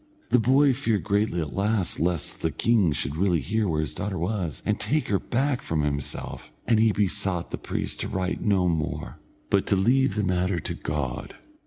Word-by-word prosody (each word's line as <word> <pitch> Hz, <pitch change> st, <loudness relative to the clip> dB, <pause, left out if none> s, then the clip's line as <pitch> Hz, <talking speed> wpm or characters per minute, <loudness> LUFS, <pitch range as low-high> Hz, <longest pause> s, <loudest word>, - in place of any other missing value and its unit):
The 125 Hz, -, +6 dB
boy 135 Hz, +4 st, +4 dB
feared 115 Hz, -6 st, 0 dB
greatly 100 Hz, -4 st, +1 dB
at 75 Hz, -3 st, -4 dB
last, 100 Hz, -2 st, 0 dB
lest 85 Hz, -2 st, 0 dB
the 80 Hz, -, +1 dB
king 105 Hz, -1 st, +2 dB
should 70 Hz, 0 st, -1 dB
really 90 Hz, 0 st, +2 dB
hear 110 Hz, +6 st, 0 dB
where 80 Hz, -3 st, 0 dB
his 80 Hz, -, -3 dB
daughter 100 Hz, -1 st, -3 dB
was, 85 Hz, -, -2 dB
and -, -, 0 dB
take 150 Hz, +8 st, 0 dB
her 100 Hz, -2 st, +2 dB
back 135 Hz, +1 st, 0 dB
from 80 Hz, -, -1 dB
himself, 70 Hz, -1 st, -4 dB
and 115 Hz, -2 st, +3 dB
he 110 Hz, 0 st, +5 dB
besought 100 Hz, -3 st, -1 dB
the -, -, -4 dB
priest -, -, -3 dB
to -, -, -1 dB
write 95 Hz, -1 st, -2 dB
no 95 Hz, -4 st, +2 dB
more, 80 Hz, -3 st, -2 dB, 0.3 s
but 100 Hz, -1 st, +2 dB
to 100 Hz, -, +3 dB
leave 125 Hz, +4 st, +3 dB
the 105 Hz, -, 0 dB
matter 90 Hz, -1 st, +1 dB
to -, -, -4 dB
God. 75 Hz, -5 st, -4 dB
95 Hz, 195 wpm, -26 LUFS, 85-110 Hz, 0.3 s, The